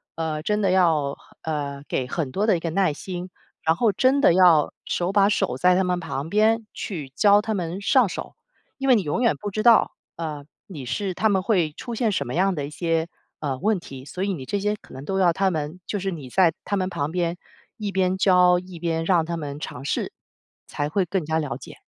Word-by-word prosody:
呃， 160 -2 -2
真 210 +4 0
的 195 -2 +2
要， 160 -7 +2 0.2
呃， 145 -3 -4
给 130 - -1
很 145 -2 -3
多 205 +9 0
的 215 - +4
一 - - -5
个 165 - -2
耐 185 -2 +2
心。 180 +3 -6 0.3
然 160 0 +3
后 225 +3 +2
真 260 +7 +3
的 175 - +6
要， 175 -5 +5
手 175 +1 -1
把 200 0 +4
手 160 -10 0
在 180 +5 +4
他 190 - +3
们 180 -1 0
旁 160 -3 -4
边 220 +3 +3
去 155 -9 -5
教 205 +3 +5
他 220 0 -2
们 180 -2 -3
上 255 +2 +4
手， - - -7 0.4
因 270 - -3
为 255 - +7
你 215 - +2
永 150 +9 -1
远 235 - +3
不 205 - -5
知 215 - -2
道， 235 -2 +6 0.3
呃， 155 -3 -5 0.2
你 150 -9 -8
是 190 - -2
他 220 - +1
们 195 -2 +2
会 180 -7 +2
出 240 - -7
现 230 -1 +1
什 195 - -1
么 125 - -4
样 190 +2 +2
的 145 -3 -3
一 - - -7
些， 165 +1 -1 0.3
呃， 140 -4 -2
问 210 +5 +2
题， 135 -6 -10
所 180 +6 -5
以 200 0 0
你 135 -7 -6
这 205 - -1
些 210 +1 0
可 - - -16
能 130 - -8
都 190 +4 -1
要 180 -2 +5
他 190 +2 +1
们， 155 +1 -4
就 205 - -3
是 195 0 -2
你 150 -7 -7
在 175 +2 +4
他 200 - -1
们 185 -1 0
旁 145 -4 -3
边 175 0 -1 0.4
一 210 -2 -3
边 185 -1 +1
教 180 -2 +5
一 180 -1 -11
边 165 -1 -1
让 170 -3 +3
他 170 +1 -3
们 145 -2 -6
尝 135 -4 -7
试， - - -1 0.6
才 145 - -2
会 195 +5 +1
更 180 -1 -2
加 160 +1 0
了 150 -3 -3
解。 - - -13
180 Hz, 250 characters per minute, -24 LUFS, 155-200 Hz, 0.6 s, 为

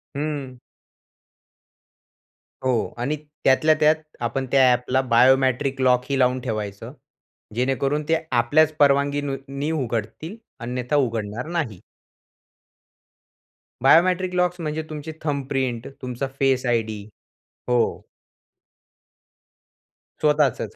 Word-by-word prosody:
हं. 140 -3 -4 2.1
हो 130 -1 +2 0.3
आणि 135 +5 -1 0.3
त्यातल्या 155 +4 +4
त्यात 155 0 +5 0.3
आपण 125 +3 -1
त्या 130 -2 +5
ॲपला 125 +2 +1
बायोमॅट्रिक 130 +2 +3
लॉक 125 -1 +3
ही 135 -1 0
लावून 125 0 +3
ठेवायचं. 105 -5 -5 0.6
जेणेकरून 135 +4 0
ते 165 - +4
आपल्याच 140 +6 +3
परवानगीनी 140 0 +1
उघडतील 130 - -3 0.3
अन्यथा 125 +3 -2
उघडणार 115 -4 -1
नाही. 155 - -3 2.0
बायोमट्रिक 180 +6 +4
लॉक्स 180 0 +1
म्हणजे 155 0 -3
तुमची 155 0 -6
थंब 145 -3 -2
प्रिंट 130 -4 -2
तुमचा 125 +1 -3
फेस 135 -1 +2
आयडी 110 -4 -1 0.7
हो. 125 -1 +3 2.4
स्वतःचच 150 -4 +1
135 Hz, 95 wpm, -23 LUFS, 125-150 Hz, 2.4 s, त्यात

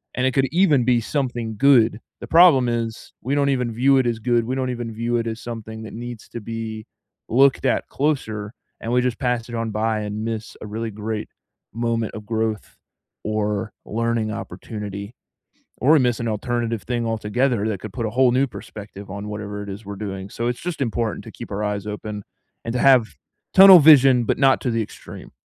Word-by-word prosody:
and 125 - 0
it 130 - +2
could 135 +1 +2
even 155 -9 +4
be 120 -2 +3
something 120 -4 -3
good. 115 -4 +4 0.2
The - - -7
problem 165 -8 +6
is 115 -1 -4
we 135 +4 -1
don't 140 -1 +2
even 125 -3 0
view 135 +4 +4
it 130 - +2
as 115 -2 -1
good; 120 0 +1
we 130 +3 -2
don't 130 -1 -1
even 120 -2 -4
view 120 +2 -1
it 115 - -2
as 115 0 -5
something 110 -1 -7
that 110 - -9
needs 120 -1 -8
to 120 - -6
be 110 0 -6 0.4
looked 135 +3 +3
at - - +1
closer, 110 -8 -2 0.3
and 115 - -4
we 125 - +3
just 125 -2 -2
pass 125 -2 -1
it 120 - -5
on 115 -1 -2
by 110 +1 0
and 105 +1 -4
miss 115 -1 -5
a 105 - -7
really 110 +1 -4
great 105 +1 -4 0.5
moment 115 -1 -1
of 105 -1 -8
growth 110 -1 -3 0.5
or 105 -1 -2
learning 115 0 -1
opportunity 105 -2 -7 0.6
or 145 +6 +5
miss 120 -3 +1
an 115 - -1
alternative 115 0 -2
thing 120 -1 -2
altogether 115 +1 0
that 100 -4 -3
could 110 - -7
put 115 +1 -3
a - - -1
whole 125 +2 +3
new 135 +2 +2
perspective 100 -4 -10
on 100 +1 -6
whatever 105 -1 -5
it 100 - -7
is 100 +3 -7
we're 100 -1 -7
doing, 95 -2 -6
so 115 +3 -3
it's 120 - -3
just 175 -3 -4
important 115 -3 -2
to - - -9
keep - - -10
our 105 +2 -3
eyes 105 0 -3
open 105 -1 -6 0.4
and 115 - -3
to 125 - -1
have 130 -5 +4 0.4
tunnel 190 -2 +10
vision, 135 -5 +7
but - - 0
not 135 -1 +4
to 125 - -1
the 115 0 0
extreme. 105 - -10
115 Hz, 205 wpm, -22 LUFS, 110-125 Hz, 0.6 s, tunnel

